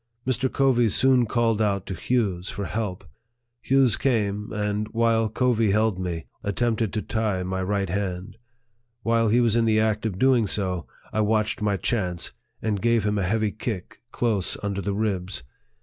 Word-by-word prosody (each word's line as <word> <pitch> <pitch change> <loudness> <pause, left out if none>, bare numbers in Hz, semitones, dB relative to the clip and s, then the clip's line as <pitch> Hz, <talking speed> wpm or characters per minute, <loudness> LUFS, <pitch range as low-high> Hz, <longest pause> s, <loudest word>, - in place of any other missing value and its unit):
Mr. 130 +1 0
Covey 125 -4 +3
soon 125 +2 +4
called 115 -1 +1
out 100 -3 0
to 95 - -4
Hughes 95 -3 -1
for 100 - -4
help." 95 -1 -4 0.5
Hughes 130 0 +3
came, 105 -5 0
and, 105 0 -1
while 115 -1 +2
Covey 115 -1 +2
held 105 -1 +2
me, 85 -3 -3 0.2
at 100 -1 -2
tempted 115 -3 0
to 105 - -1
tie 105 -4 -1
my 95 +1 -2
right 100 +1 0
hand. 95 +2 -3 0.7
While 115 0 +2
he 115 +3 +4
was 115 -2 +3
in 115 -1 +3
the 110 -1 +3
act 110 0 +1
of 95 -4 -4
doing 125 -2 +3
so, 95 -4 -2 0.3
I 110 - +1
watched 110 0 +1
my 105 -2 +1
chance, 90 -6 -1 0.3
and 105 -3 -1
gave 115 -2 +2
him 105 0 0
a - - 0
heavy 110 +1 +1
kick 105 -2 -5
close 110 -7 0
under 100 -1 -2
the 100 +1 -2
ribs. 95 -7 -2
105 Hz, 175 wpm, -25 LUFS, 100-115 Hz, 0.7 s, soon